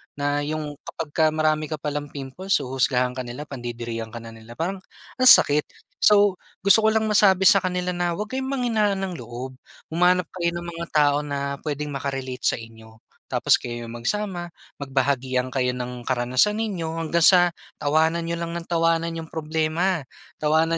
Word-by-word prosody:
Na 145 0 0
'yong 150 0 -4
kapag 160 -2 -6
ka 160 - +1
marami 155 0 0
ka 155 - -3
palang 145 -1 -4
pimples 145 +8 -3
huhusgahan 125 -1 +1
ka 130 - -4
nila, 120 +5 -6
pandidirihan 120 -4 -6
ka 120 - -8
na 115 - -9
nila. 115 +1 -13
Parang 185 +7 -3 0.4
ang 255 - +5
sakit. 150 - +7 0.4
So, 205 -2 +5 0.2
gusto 200 +3 +5
ko 220 - +4
lang 220 0 +1
masabi 195 -3 +5
sa 195 -2 +6
kanila 180 0 -1
na 175 0 0
huwag 210 +5 -3
kayong 265 0 -2
panghinaan 220 -7 +1
ng 190 -2 -3
loob. 125 0 -7 0.3
Humanap 180 +1 +2
kayo 170 -1 0
ng 175 - -8
mga 170 0 -5
tao 145 -1 +4
na 140 -1 -3
puwedeng 150 -1 -3
maka-relate 135 -2 -4
sa - - +1
inyo, 110 0 -14 0.3
tapos - - +4
kayo 120 -1 -6
magsama, 175 - -3 0.3
magbahagian 130 -2 0
kayo 125 -1 0
ng 125 -1 -6
karanasan 130 - +1
ninyo 185 -8 -2
hanggang 165 +1 +1
sa, 175 -1 +6 0.2
tawanan 160 +3 +1
nyo 170 - -1
lang 170 0 -4
ng 170 0 -6
tawanan 165 0 +1
'yong 165 -1 -7
problema. 160 +2 -1 0.4
Tawanan 160 +2 +2
155 Hz, 170 wpm, -24 LUFS, 130-175 Hz, 0.4 s, sakit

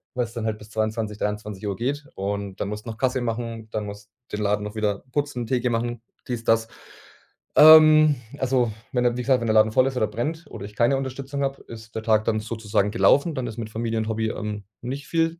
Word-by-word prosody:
weil's 120 -2 -2
dann 115 -2 -4
halt 110 -1 -1
bis 105 0 -14
22:00, 110 -1 -2
23:00 105 -1 -3
geht 145 +5 -2
und 100 0 -3
dann 100 - -1
musst 105 +1 -6
noch 110 -1 -6
Kasse 130 0 0
machen, 115 -1 -4
dann 105 -1 -2
musst 100 0 -9 0.2
den 105 - -3
Laden 105 0 +1
noch 105 +1 -7
wieder 105 -2 -1
putzen, 140 -5 -2
Theke 125 -1 +1
machen, 120 0 -2 0.3
dies, 120 -2 -3
das. 115 0 +2 0.9
Ähm, 155 -1 +8 0.2
also, 125 -4 +1 0.2
wenn 125 -1 +2
der 120 0 +2
wie - - -1
gesagt, 130 -1 +3
wenn 115 - -2
der 110 - +2
Laden 110 0 +5
voll 130 +4 +4
ist 130 -1 -3
oder 110 - +2
brennt 155 +10 -3
oder 100 - -7
ich 105 0 -11
keine 120 +4 +3
Unterstützung 135 +1 -4
habe, 135 0 -3
ist 110 -1 -11
der 110 - -3
Tag 110 -1 +3
dann 110 -1 +1
sozusagen 105 -2 -1
gelaufen. 140 - +4
Dann 125 -2 -2
ist 110 0 -7
mit 110 -2 -5
Familie 115 0 -2
und 110 - -2
Hobby, 110 0 -1
ähm, 105 -2 -5 0.2
nicht 135 +4 -5
viel, 165 0 0
115 Hz, 220 wpm, -24 LUFS, 105-130 Hz, 0.9 s, Ähm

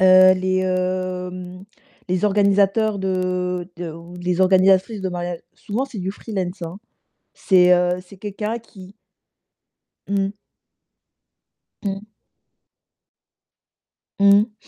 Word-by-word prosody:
heu, 185 0 +8
les, 185 0 0
hem, 185 0 -3 0.4
les 180 +2 0
organisateurs 200 +1 +2
de 180 -1 -1
de 175 -1 -5
ou 165 +2 -11
les 180 0 -1
organisatrices 190 +3 +4
de 190 - -1
mariage 175 -1 -4
souvent, 225 +5 -3
c'est 245 -6 -9
du 185 0 -2
freelance, 190 -4 -5
hein. 170 +3 -6 0.6
C'est 180 -2 +4
heu, 180 0 +2
c'est 195 +2 -15
quelqu'un 210 +3 -4
qui 190 -4 -14 1.2
Mmh. 200 0 0 1.5
Mmh. 195 -1 -3 2.2
Mmh. 200 +2 +5
185 Hz, 100 wpm, -21 LUFS, 180-200 Hz, 2.2 s, heu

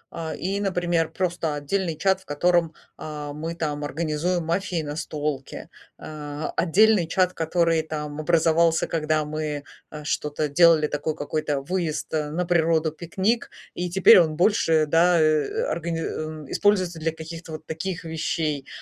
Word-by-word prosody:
а, 160 -1 -4
и, 195 +2 -2
например, 175 -4 0
просто 175 -4 -2
отдельный 165 +3 -2
чат, 190 +2 +1
в - - -22
котором, 170 +1 +1 0.2
а, 150 -1 -6
мы 160 +3 -5
там 150 -3 -3
организуем 160 +4 -1
мафии 180 +2 -1
и - - -7
настолки, 150 -2 -4 0.3
а, 150 0 -6
отдельный 195 +1 +4
чат, 185 +1 +1
который 165 0 +1
там 150 -1 -5
образовался, 165 0 +3
когда 155 -1 0
мы, 150 -1 -4 0.3
а, 150 -1 -8
что-то 150 0 -1
делали, 165 0 +5
такой 150 +1 -2
какой-то 145 -1 -2
выезд 160 -1 -3
на 155 +3 -1
природу, 165 -2 +2
пикник, 190 +9 -1 0.2
и 180 0 -3
теперь 185 +1 +7
он 155 -3 +2
больше, 165 -4 +3
да, 170 +3 +4
э, 155 - +2
органи 170 0 -2
а, 155 -1 -5
используется 185 -5 +1
для 160 +1 0
каких-то 165 +1 -9
вот 155 0 -8
таких 165 +3 -4
вещей, 155 -3 -2
160 Hz, 145 wpm, -24 LUFS, 150-175 Hz, 0.3 s, теперь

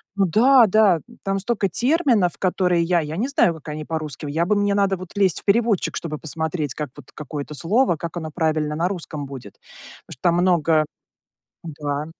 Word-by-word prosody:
ну 200 -1 +2
да, 240 - +5
да, 200 -4 +4 0.2
там 195 -1 -1
столько 205 -1 -1
терминов, 245 - +2
которые 180 -2 +1
я, 175 +1 +2
я 155 0 -5
не 230 +7 0
знаю, 230 - +2
как 155 -1 -11
они 150 0 -5
по-русски. 155 -1 -4
Я 160 +4 0
бы, 210 +4 +2
мне 205 0 +1
надо 195 -1 +2
вот 185 -1 -10
лезть 195 -5 +2
в - - -33
переводчик, 220 -1 +2
чтобы 155 -2 -4
посмотреть, 160 -2 -3
как 150 -2 -5
вот 145 -4 -14
какое-то 150 0 -6
слово, 200 - +2
как 170 +3 -6
оно 160 -2 -5
правильно 155 -2 -1
на 170 +3 0
русском 165 -6 -5
будет. 130 -7 -10 0.5
Потому - - -10
что - - -18
там 170 -1 +3
много 165 -3 +3 0.8
Да. 145 -2 -4
170 Hz, 190 wpm, -22 LUFS, 155-200 Hz, 0.8 s, да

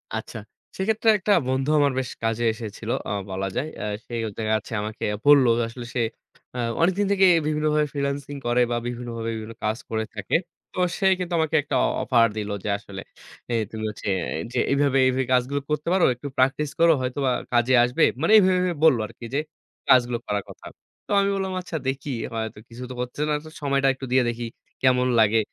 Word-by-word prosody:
আচ্ছা, 110 +1 -5 0.4
সেক্ষেত্রে 220 +3 +1
একটা 205 +1 -1 0.2
বন্ধু 130 +2 0
আমার 145 -1 +3
বেশ 130 - -3
কাজে 115 +1 0
এসেছিল 110 -1 -8 0.2
আ - - -2 0.2
বলা 95 +1 -2
যায়। 150 - -1 0.2
আ - - -2 0.2
সে - - -11
হচ্ছে 105 -1 -7
দেখা 110 -1 0
যাচ্ছে 110 +2 -9
আমাকে 105 +1 -4 0.2
বলল, 145 -2 +7 0.2
আসলে 120 +1 -8
সে 125 - +1 0.5
আ - - -3 0.2
অনেকদিন 190 +4 +2
থেকেই 190 -2 +5 0.2
বিভিন্নভাবে 150 0 +1
ফ্রিল্যান্সিং 140 0 -3
করে 120 +1 +3
বা 120 - +1
বিভিন্নভাবে 120 -2 -4
বিভিন্ন 110 +1 -7
কাজ 110 +1 0
করে 110 0 -1
থাকে। 105 - -2 0.4
তো - - -5 0.2
সে 195 - 0
কিন্তু 180 -1 -3
আমাকে 160 0 0
একটা 145 -1 -3 0.3
অফার 115 -3 +4
দিলো 105 -1 -3
যে, - - -5
আসলে 100 -1 -9 0.5
যে - - -2 0.2
তুমি 110 -1 -6
হচ্ছে 105 - -8 0.4
যে - - -1
"এইভাবে, 140 -1 +2
এইভাবে 130 +1 +1
কাজগুলো 130 +3 +1
করতে 150 +1 -2
পারো, 185 -2 +4
একটু 125 +4 -8
প্র্যাকটিস 135 +3 +2
করো। 165 0 +6
হয়তোবা 130 +1 -1 0.2
কাজে 120 +2 +3
আসবে।" 125 +7 +1 0.2
মানে 165 - +2
এইভাবে 190 -3 +5
এইভাবে 180 -1 0
বললো 145 -7 +6
আরকি, 120 - -12
যে 140 - +2 0.5
কাজগুলো 120 -1 +5
করার 105 -1 -1
কথা। - - -13 0.4
তো - - -8
আমি 200 0 +2
বললাম, 190 -1 -2
"আচ্ছা 175 -2 -5
দেখি," 135 +2 -2 0.2
হয়তো 110 -1 -4
কিছু 120 +2 -9
তো - - -6
করতে 125 0 -4
হচ্ছে 150 - -2
না। - - +2 0.3
সময়টা 140 -1 +1
একটু 135 0 -8
দিয়ে 130 0 +4
দেখি 120 0 -4 0.4
কেমন 125 -1 +3
লাগে। 110 +1 +4
130 Hz, 195 wpm, -24 LUFS, 115-150 Hz, 0.5 s, বলল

